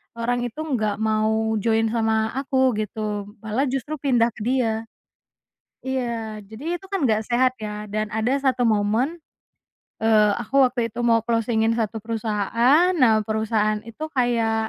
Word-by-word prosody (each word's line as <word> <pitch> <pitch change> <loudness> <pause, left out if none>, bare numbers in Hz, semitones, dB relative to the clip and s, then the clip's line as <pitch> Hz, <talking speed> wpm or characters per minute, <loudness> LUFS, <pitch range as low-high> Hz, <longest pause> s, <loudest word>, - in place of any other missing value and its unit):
orang 240 +1 -1
itu 245 +5 -4
enggak 220 -9 -1
mau 220 0 +1
join 225 +1 +1
sama 220 -1 +1
aku 265 0 +1
gitu 210 -1 -3 0.2
malah 225 +6 0
justru 270 +3 -3
pindah 240 -4 +2
ke - - -15
dia. 225 -1 0 1.0
Iya 235 -5 -3
jadi 260 - -5
itu - - -12
kan 385 -9 +1
nggak 220 -1 +1
sehat 255 +2 +3
ya 210 0 -5
dan 215 0 -3
ada 220 +4 0
satu 255 -3 +2
momen, 225 +10 +1 0.7
eee, 215 -2 +4
aku 250 +4 +1
waktu 245 -3 +2
itu 235 - -5
mau 230 -2 +3
closing-in 230 -1 +1
satu 220 -2 -2
perusahaan 230 - +2
nah 225 -10 +3
perusahaan 215 0 0
itu 230 +8 -8
kayak, 230 -3 +1
230 Hz, 145 wpm, -23 LUFS, 220-255 Hz, 1.0 s, eee